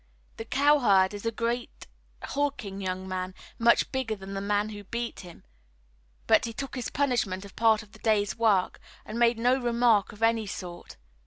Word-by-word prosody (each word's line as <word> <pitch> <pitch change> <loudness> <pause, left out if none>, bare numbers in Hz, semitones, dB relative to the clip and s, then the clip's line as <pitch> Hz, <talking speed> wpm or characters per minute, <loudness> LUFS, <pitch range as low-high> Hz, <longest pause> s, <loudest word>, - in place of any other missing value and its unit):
The 225 - -6
cowherd 245 -9 +4
is 205 +2 -5
a - - +1
great 235 +2 -3 0.4
hulking 275 -9 -3
young 185 0 -3
man, 185 0 -4 0.2
much 235 0 +4
bigger 260 -5 -2
than 195 -1 -9
the 195 - -3
man 205 +1 0
who 205 -1 -8
beat 235 +4 -4
him, 175 -2 -12 0.8
but - - +4
he 230 - -5
took 275 +4 -6
his 250 -3 -4
punishment 220 -9 0
as 200 - -11
part 220 0 +3
of 210 - -20
the 220 - -16
day's 210 -3 +1
work 215 -5 +2 0.3
and 220 +2 -5
made 235 -1 +4
no 250 +3 +2
remark 235 -3 +3
of 210 +2 -8
any 225 -2 +2
sort. 175 - -8
220 Hz, 180 wpm, -27 LUFS, 195-235 Hz, 0.8 s, cowherd